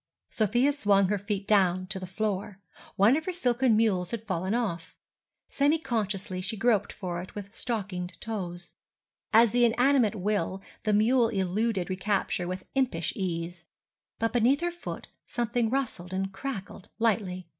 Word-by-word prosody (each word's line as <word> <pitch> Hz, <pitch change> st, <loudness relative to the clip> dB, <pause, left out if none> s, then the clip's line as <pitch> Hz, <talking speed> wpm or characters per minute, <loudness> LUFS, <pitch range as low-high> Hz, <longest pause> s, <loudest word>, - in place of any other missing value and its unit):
Sofia 240 Hz, +6 st, +2 dB
swung 200 Hz, -8 st, +3 dB
her 205 Hz, -1 st, +1 dB
feet 200 Hz, -1 st, -3 dB
down 185 Hz, -3 st, +3 dB
to 190 Hz, +1 st, -5 dB
the 185 Hz, -, -6 dB
floor. 200 Hz, 0 st, -3 dB, 0.4 s
One 210 Hz, +7 st, +5 dB
of 315 Hz, +1 st, -2 dB
her 370 Hz, -, -1 dB
silken 250 Hz, -8 st, +2 dB
mules 190 Hz, -6 st, +2 dB
had 225 Hz, +1 st, -5 dB
fallen 190 Hz, +1 st, -1 dB
off. 200 Hz, -9 st, -3 dB, 0.5 s
Semi 290 Hz, +3 st, +2 dB
consciously 210 Hz, -, -2 dB
she 215 Hz, +4 st, -3 dB
groped 220 Hz, -1 st, +2 dB
for 180 Hz, -3 st, -4 dB
it 185 Hz, -, -11 dB
with 200 Hz, 0 st, -7 dB
stockinged 185 Hz, -7 st, -3 dB
toes. 175 Hz, -6 st, -5 dB, 0.6 s
As 230 Hz, 0 st, +6 dB
the 245 Hz, 0 st, +3 dB
inanimate 245 Hz, -1 st, +3 dB
will, 195 Hz, -2 st, -1 dB, 0.3 s
the 215 Hz, -, +2 dB
mule 230 Hz, +3 st, +4 dB
eluded 195 Hz, -1 st, 0 dB
recapture 190 Hz, -1 st, -1 dB
with 185 Hz, +1 st, -5 dB
impish 255 Hz, -12 st, 0 dB
ease. 175 Hz, -2 st, -3 dB, 0.5 s
But 225 Hz, 0 st, 0 dB
beneath 245 Hz, +5 st, +3 dB
her 345 Hz, 0 st, 0 dB
foot 345 Hz, -, -7 dB, 0.2 s
something 235 Hz, -1 st, 0 dB
rustled 225 Hz, -9 st, -2 dB
and 195 Hz, 0 st, -2 dB
crackled 195 Hz, -4 st, -6 dB
lightly. 200 Hz, -5 st, 0 dB
210 Hz, 155 wpm, -28 LUFS, 185-235 Hz, 0.6 s, As